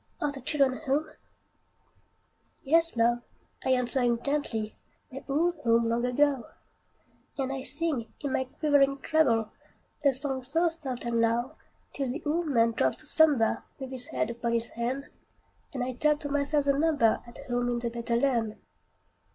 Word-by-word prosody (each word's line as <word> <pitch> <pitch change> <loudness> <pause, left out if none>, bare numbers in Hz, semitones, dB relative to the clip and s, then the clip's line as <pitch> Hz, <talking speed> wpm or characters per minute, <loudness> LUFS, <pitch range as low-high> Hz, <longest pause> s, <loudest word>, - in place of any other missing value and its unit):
are 295 - 0
the 275 -1 -8
children 265 -1 +1
home?" 290 +4 0 1.5
"Yes, 330 0 +3
love!" 240 +1 +3 0.4
I - - -1
answer 250 +1 +2
him 240 -1 +2
gently, 255 -7 -2 0.4
"They're 270 +2 -8
all 315 +5 +2
home 230 -1 +3
long 235 +1 +1
ago;" 270 -1 +2 0.9
And 270 -1 -1
I 270 - -4
sing, 280 -3 -2
in 280 -2 -3
my 260 - +1
quivering 275 0 +2
treble, 235 -9 +2 0.5
A 280 - +5
song 265 0 -2
so 325 +7 +1
soft 270 -7 -6
and 235 -1 +1
low, 240 +5 +1 0.4
Till 275 -1 -2
the 270 +7 -4
old 325 +3 0
man 230 -5 +3
drops 130 - 0
to - - -14
slumber, 295 -7 +3 0.2
With 265 -1 -7
his 260 +1 -2
head 235 -8 -1
upon 235 0 -2
his 230 0 0
hand, 255 +4 -3 0.6
And 255 -2 -3
I 255 +1 -3
tell 300 +4 +2
to 290 -1 -6
myself 285 0 +1
the 280 - +4
number 285 -6 +2
At 235 - -12
home 245 0 0
in 240 - 0
the 235 0 -2
better 235 0 -2
land. 235 -4 +1
265 Hz, 165 wpm, -28 LUFS, 235-290 Hz, 1.5 s, A